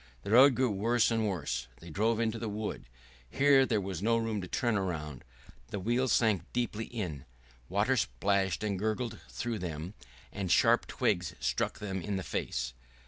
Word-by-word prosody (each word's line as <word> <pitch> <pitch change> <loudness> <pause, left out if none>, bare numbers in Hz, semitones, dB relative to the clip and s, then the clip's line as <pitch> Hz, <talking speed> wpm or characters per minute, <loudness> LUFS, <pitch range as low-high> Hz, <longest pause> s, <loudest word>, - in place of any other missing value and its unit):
The - - -4
road 130 +3 +8
grew 130 -2 +2
worse 115 +4 +2
and 110 -1 +1
worse.... 65 -10 -2
They 85 0 -11
drove 110 +6 +1
into 115 0 0
the 115 -1 -3
wood. 105 -8 -4 0.4
Here 135 -1 +5
there 110 -3 +2
was 95 -3 -4
no 115 +2 +3
room 115 -3 -1
to 90 - -6
turn 120 +1 0
round, 75 -8 -4 0.4
the 100 - -4
wheels 120 +6 +1
sank 105 -7 +2
deeply 115 -2 -1
in, 90 - -5 0.5
water - - +2
splashed 95 - 0
and 100 -3 -1
gurgled 110 +2 -2
through 120 -3 -3
them, 85 +1 -5 0.4
and 95 -3 -3
sharp - - +4
twigs - - 0
struck - - -1
them 95 -2 -4
in 105 +2 -3
the 95 - -2
face. - - -3
105 Hz, 175 wpm, -31 LUFS, 90-115 Hz, 0.5 s, road